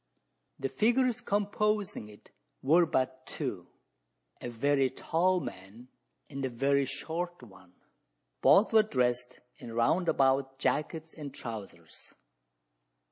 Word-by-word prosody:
The 135 - -2
figures 240 - +2
composing 205 - -1
it 105 - -17 0.3
were 165 +5 +5
but 130 -2 -1
two - - -4 0.7
a 120 - -4
very 135 +3 +2
tall 180 +7 +1
man, 110 - -9 0.4
and 140 -1 -6
a 130 - 0
very 135 +3 +2
short 175 +2 -5
one. 95 -5 -16 0.7
Both 215 +3 +5
were 220 - +8
dressed 125 - -1 0.2
in 115 - -8
round 160 +10 +2
about 135 0 +2
jackets 160 +3 -1
and 145 -3 -7
trousers. 100 -10 -9
135 Hz, 115 wpm, -30 LUFS, 125-175 Hz, 0.7 s, were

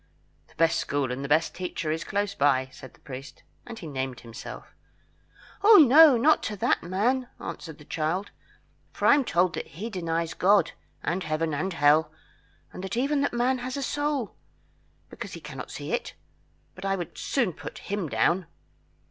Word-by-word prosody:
"The - - -24
best 165 0 +3
school 140 -3 -1
and 130 +2 -4
the 140 - -5
best 155 +2 +2
teacher 180 -3 -3
is 160 +1 -2
close 205 0 -1
by," 135 -4 +2
said 130 - -12
the - - -25
priest, 135 +1 -10 0.2
and 235 -1 -8
he 180 - -9
named 130 -4 -4
himself. 115 -1 -10 0.9
"Oh, 430 +1 +9 0.4
not 305 +6 +4
to 215 - -3
that 195 - +1
man," 235 +9 0
answered 160 -3 -7
the 150 - -15
child, 165 +7 -2 0.6
"for - - -4
I - - +8
am 285 -1 +3
told 180 -5 +1
he 210 +10 -6
denies 165 -3 -2
God, 200 +2 +3 0.3
and 180 +2 -1
Heaven, 155 0 -1
and 185 +6 -2
Hell, 150 +1 +4 0.6
and 190 +4 -5
even 280 +3 +1
that 285 - +1
man 250 +2 +1
has 255 +2 -4
a 280 - -2
soul, 290 -5 -2 0.8
because - - -8
he - - -7
cannot - - -8
see - - -6
it; - - -3 0.6
but 185 - -12
I 195 0 +1
would 175 -4 -6
soon 240 -10 0
put - - -9
him 200 -5 -4
down." 175 +5 +1
180 Hz, 175 wpm, -27 LUFS, 155-230 Hz, 0.9 s, Oh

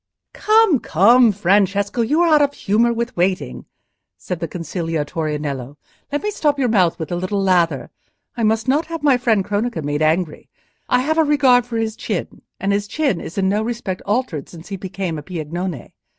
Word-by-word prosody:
"Come, 430 - +4
come, 230 +8 +5
Francesco, 200 +3 +1
you 295 +9 +2
are 335 -2 +4
out 300 - +5
of 285 0 +1
humour 225 +4 +2
with 235 +2 -3
waiting," 185 +2 -1 0.5
said 180 -2 -5
the 165 - -3
conciliatory 165 -2 -3
Nello. 140 -2 -5 0.3
"Let 290 - -2
me 420 - -1
stop 295 -7 0
your 260 -3 +1
mouth 185 -6 +2
with 160 0 -6
a - - 0
little 185 +3 -2
lather. 170 -8 +1 0.4
I 240 - -4
must 220 +2 +1
not 290 +5 +1
have 330 -2 -6
my 280 -4 +4
friend 225 -6 +1
Cronaca 205 -4 -2
made 145 +1 -2
angry: 155 +1 0 0.4
I 250 - +3
have 315 +4 0
a - - +6
regard 265 -5 +3
for 235 -2 -3
his 220 -1 -2
chin; - - -4 0.2
and 195 - 0
his 205 0 -1
chin 270 - -1
is 170 - -9
in 190 -1 +1
no 205 +2 +1
respect 220 -5 -4
altered 205 - -2
since 170 +1 -12
he 200 - -4
became 190 -3 -4
a - - -7
Piagnone. 170 0 -5
200 Hz, 195 wpm, -20 LUFS, 170-245 Hz, 0.5 s, a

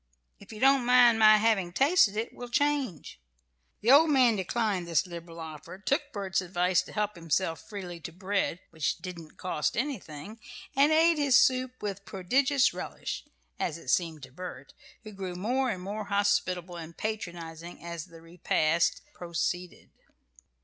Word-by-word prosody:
If - - -14
you 215 - -9
don't 270 0 +5
mind 245 -2 +6
my 215 -1 +8
having 210 -5 +1
tasted 265 - +3
it, 225 +2 -3
we'll 245 0 -8
change." 270 - -1 0.6
The 230 - +4
old 305 +4 +7
man 255 -6 +4
declined 195 -2 -1
this 170 +3 +2
liberal 170 -1 -9
offer, 160 +2 -8
took 280 +8 -1
Bert's 195 -4 -1
advice 180 0 +1
to - - -12
help 210 -1 -1
himself 165 0 -1
freely 185 -5 -7
to 165 - -8
bread, 190 0 -2
which 160 -3 -1
"didn't 170 -4 -9
cost 165 -2 -2
anything," 215 - -4 0.4
and 280 +3 +5
ate 325 0 +4
his 280 -4 +5
soup 255 -1 +2
with 200 -1 -4
prodigious 260 +9 +2
relish, - - -6 0.3
as 165 - -2
it 135 - -10
seemed 160 -1 0
to 130 - -10
Bert, 140 -4 -9 0.3
who 215 - -9
grew 190 -3 -6
more 250 +8 0
and 185 -5 -4
more 210 +2 -4
hospitable 190 -3 0
and 165 0 -9
patronizing 175 -6 -6
as 170 -2 -5
the 165 -2 -15
repast 165 -1 +1
proceeded. 175 +1 -4
190 Hz, 155 wpm, -29 LUFS, 170-240 Hz, 0.6 s, my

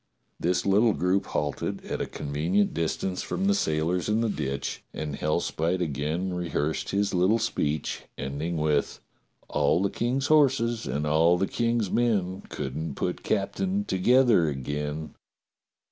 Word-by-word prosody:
This 90 +2 0
little 105 +3 +4
group 95 +2 +1
h - - -10
alted 75 -1 -2
at - - -3
a - - -2
convenient 80 +8 0
distance 85 +3 -1
from 195 - -2
the 200 - +4
sailors 85 - 0
in 110 +2 +2
the 115 - +1
ditch, 70 -7 -3
and 75 -2 -3
Hellspite 80 +4 0
again 80 +3 -2
rehearsed 85 -3 -2
his 100 0 0
little 95 +5 +3
speech, 75 - -2
ending 75 +6 -3
up 75 - -1
with: 75 -2 +1 0.5
"*A11 75 +5 +2
the 100 - +2
King's 130 +3 -1
horses 135 -7 +3
and 70 +4 -1
all 80 +3 +4
the 95 - +1
King's 115 -2 0
men 100 -6 +1
Could - - -4
not 80 -3 -4
put - - -2
captain 190 - -1
together 115 - +4
again.' 75 +3 -4
90 Hz, 150 wpm, -27 LUFS, 75-110 Hz, 0.5 s, little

